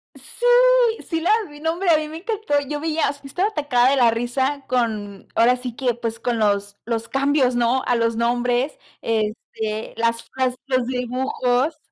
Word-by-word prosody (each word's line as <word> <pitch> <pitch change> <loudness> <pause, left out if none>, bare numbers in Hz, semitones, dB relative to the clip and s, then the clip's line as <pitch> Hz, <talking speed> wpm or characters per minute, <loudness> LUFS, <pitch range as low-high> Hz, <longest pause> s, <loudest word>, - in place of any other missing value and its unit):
¡Sí! 485 - -5 0.6
Sí 325 -1 -1
la 345 +5 0 0.2
vi 295 0 -13
nombre, 335 +4 -1
a 320 - +6
mí 305 0 -3
me 315 +1 -7
encantó, 400 -6 -1
yo 295 0 -3
veía 320 0 0 0.2
estaba 355 +9 0
atacada 280 - +2
de 280 - +2
la 240 -3 +5
risa 260 +5 -1
con 215 -5 -2
ahora 245 +2 +4
sí 250 -1 -6
que, 245 -1 0
pues, 230 -1 -5
con 235 -1 -1
los 205 -1 0
los 230 -1 -3
cambios, 270 -2 +2
¿no? 240 +2 +2
A 245 - +2
los 230 -1 0
nombres, 245 +3 0 0.2
este, 220 0 -3
las 230 0 0
frases, 255 -1 -2
los 255 -2 0
dibujos. 255 +3 -1
250 Hz, 170 wpm, -22 LUFS, 230-290 Hz, 0.6 s, a